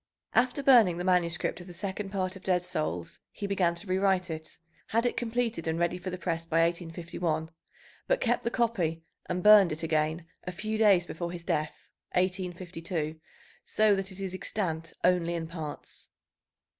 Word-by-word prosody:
After 255 +3 +2
burning 230 -10 +6
the 175 - -3
manuscript 180 -1 +1
of 175 - -11
the 175 - -7
second 195 +2 -3
part 185 -1 -2
of 190 - -10
Dead 180 -1 +1
Souls, 90 - -2
he 205 - -6
began 185 -4 +1
to 190 - -4
rewrite 190 -1 +1
it, 160 0 -7 0.3
had 230 +2 +1
it 245 - +1
completed 235 -7 -1
and 160 0 0
ready 170 +1 0
for 185 +1 -5
the 180 - -4
press 165 -2 -2
by 165 0 +2
1851, 165 -1 -2 0.6
but - - +2
kept 485 - +1
the 235 - -1
copy 190 -10 0 0.2
and 180 0 -2
burned 210 -4 +8
it 155 +2 -3
again 160 +1 0 0.2
a 180 - -4
few 215 +4 -3
days 200 -5 +5
before 170 0 -4
his 175 -1 -7
death 155 -2 -2 0.3
(1852), 175 -3 -2 0.4
so 215 -1 +3
that 195 0 -2
it 190 - -10
is 190 -2 -4
extant 165 -4 -3
only 175 -1 +3
in 165 -1 -3
parts. 160 -3 -7
180 Hz, 175 wpm, -29 LUFS, 165-195 Hz, 0.6 s, burned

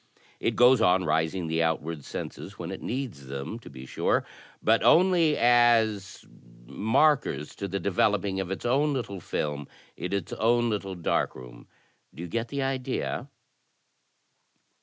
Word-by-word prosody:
It - - -1
goes 125 0 +6
on,|ising 90 -2 +2
the 80 0 0
outward 80 -2 -1
senses 90 +9 -7
when 85 +1 -6
it 95 - -7
needs 115 - -5
them, 70 - -5
to - - -13
l^jsiure, 65 0 -1 0.4
but 115 +1 +4
only 170 -4 +4
as 115 -5 +3 0.4
sMs 115 - +1
to 100 - -3
the 100 +1 -3
developing 100 +1 +1
of 95 -2 -3
its 95 - -5
own 140 +5 +2
little 115 -7 -4
film 75 -4 -3 0.3
in 90 - -5
its 100 -4 -3
own 120 +1 +2
little 100 -2 -3
dark 85 - -1
room. - - -12 0.5
Do 80 - -7
you - - -5
get 115 +5 -2
the 140 +2 -3
idea?" 135 0 -3
100 Hz, 140 wpm, -27 LUFS, 85-120 Hz, 0.5 s, goes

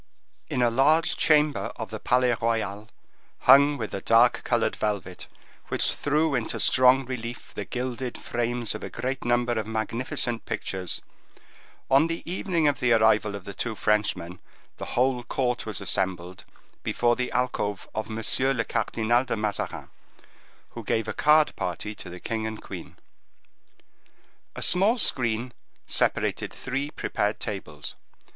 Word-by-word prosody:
In 125 - +1
a 120 - +3
large 150 +7 +3
chamber 150 -2 +3
of 110 -2 -6
the 110 - -5
Palais 125 +2 +2
Royal, 110 -2 -1 0.5
hung 140 +2 +7
with 110 -4 -5
a 95 - -3
dark 115 +2 +4
colored - - +1
velvet, 100 -4 -3 0.4
which - - +1
threw 150 +1 +1
into 120 -4 -2
strong 130 +1 +5
relief 120 -2 -6
the - - -5
gilded 125 0 -4
frames 120 -1 -2
of 110 - -7
a - - -5
great 130 +3 -3
number 120 0 +1
of 110 -2 -2
magnificent 115 +2 -2
pictures, 95 -2 -4 0.8
on 140 +4 +5
the 165 0 -4
evening 175 -2 0
of 145 - +1
the 125 -1 +2
arrival 110 -2 +3
of 100 -2 -8
the 100 - -6
two 115 +2 -3
Frenchmen, 100 -5 0 0.4
the - - -5
whole 125 0 +3
court 125 -1 -2
was 105 -4 -4
assembled 90 -1 -2 0.4
before 120 0 +1
the 125 0 -2
alcove 120 -5 -1
of 110 0 -3
M. 110 - -4 0.4
le 115 - 0
Cardinal 115 +2 +1
de 125 -3 -3
Mazarin, 105 -1 -3 0.8
who - - -8
gave 110 -1 0
a 110 - -2
card 150 +4 +4
party 90 +4 -3
to 95 - -9
the 90 0 -8
king 110 +2 -3
and 110 0 -6
queen. - - -9 1.6
A - - -3
small 200 +7 +3
screen 120 - 0 0.3
separated - - 0
three 135 +3 -3
prepared 105 -7 -2
tables. 80 -8 -5
120 Hz, 150 wpm, -26 LUFS, 110-130 Hz, 1.6 s, hung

